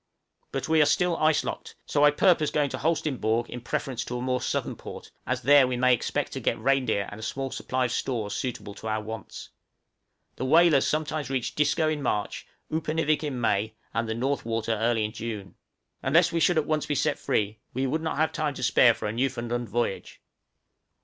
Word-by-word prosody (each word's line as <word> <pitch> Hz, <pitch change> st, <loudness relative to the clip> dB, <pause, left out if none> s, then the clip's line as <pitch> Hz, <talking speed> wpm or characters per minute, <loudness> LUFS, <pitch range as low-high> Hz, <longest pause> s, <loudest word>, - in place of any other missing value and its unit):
But -, -, -3 dB
we 160 Hz, -1 st, +4 dB
are 150 Hz, -, +5 dB
still 175 Hz, +3 st, +2 dB
ice 155 Hz, -1 st, +3 dB
locked, -, -, -6 dB
so 145 Hz, -, +1 dB
I 150 Hz, -, +8 dB
purpose 155 Hz, 0 st, +3 dB
going 145 Hz, -3 st, 0 dB
to -, -, -4 dB
Holsteinborg 130 Hz, -8 st, 0 dB
in 125 Hz, -, -6 dB
preference 125 Hz, +1 st, -3 dB
to 125 Hz, -, -4 dB
a -, -, -4 dB
more 125 Hz, -1 st, 0 dB
southern -, -, -2 dB
port, -, -, -10 dB, 0.2 s
as 125 Hz, 0 st, -1 dB
there 140 Hz, 0 st, +6 dB
we 125 Hz, -1 st, -2 dB
may 125 Hz, 0 st, +4 dB
expect 120 Hz, -, -1 dB
to -, -, -4 dB
get -, -, 0 dB
reindeer 130 Hz, -7 st, +1 dB
and 105 Hz, -, -8 dB
a -, -, -9 dB
small 135 Hz, +4 st, -3 dB
supply 130 Hz, 0 st, -1 dB
of 120 Hz, -, -2 dB
stores 110 Hz, -7 st, -2 dB
suitable 125 Hz, -5 st, -4 dB
to 110 Hz, -, -8 dB
our 110 Hz, 0 st, 0 dB
wants. 110 Hz, +1 st, -8 dB, 0.9 s
The 130 Hz, -, -2 dB
whalers 160 Hz, 0 st, +5 dB
sometimes 155 Hz, -2 st, -1 dB
reach 130 Hz, -3 st, -2 dB
Disco 150 Hz, +2 st, +2 dB
in 155 Hz, -1 st, -1 dB
March, 105 Hz, -6 st, -2 dB, 0.3 s
Upernivik 155 Hz, -1 st, 0 dB
in 140 Hz, -4 st, -3 dB
May, 110 Hz, -1 st, 0 dB, 0.2 s
and 115 Hz, 0 st, -1 dB
the 110 Hz, -, -1 dB
North 135 Hz, +4 st, -1 dB
Water 115 Hz, 0 st, -2 dB
early 115 Hz, 0 st, +1 dB
in 105 Hz, -, -4 dB
June. 110 Hz, -4 st, -6 dB, 0.5 s
Unless 165 Hz, +7 st, +3 dB
we 170 Hz, -, 0 dB
should 175 Hz, +2 st, +3 dB
be 155 Hz, -, +4 dB
at -, -, -14 dB
once 155 Hz, -1 st, 0 dB
set 150 Hz, -2 st, 0 dB
free, 105 Hz, 0 st, -1 dB, 0.2 s
we 130 Hz, +1 st, 0 dB
would 155 Hz, +5 st, -1 dB
not 160 Hz, -2 st, -2 dB
have 155 Hz, +1 st, +2 dB
time 150 Hz, -3 st, -2 dB
to -, -, -6 dB
spare 120 Hz, -2 st, +5 dB
for -, -, -6 dB
a 105 Hz, -, -3 dB
Newfoundland 120 Hz, -1 st, -2 dB
voyage. 120 Hz, -5 st, -2 dB
130 Hz, 210 wpm, -27 LUFS, 115-150 Hz, 0.9 s, I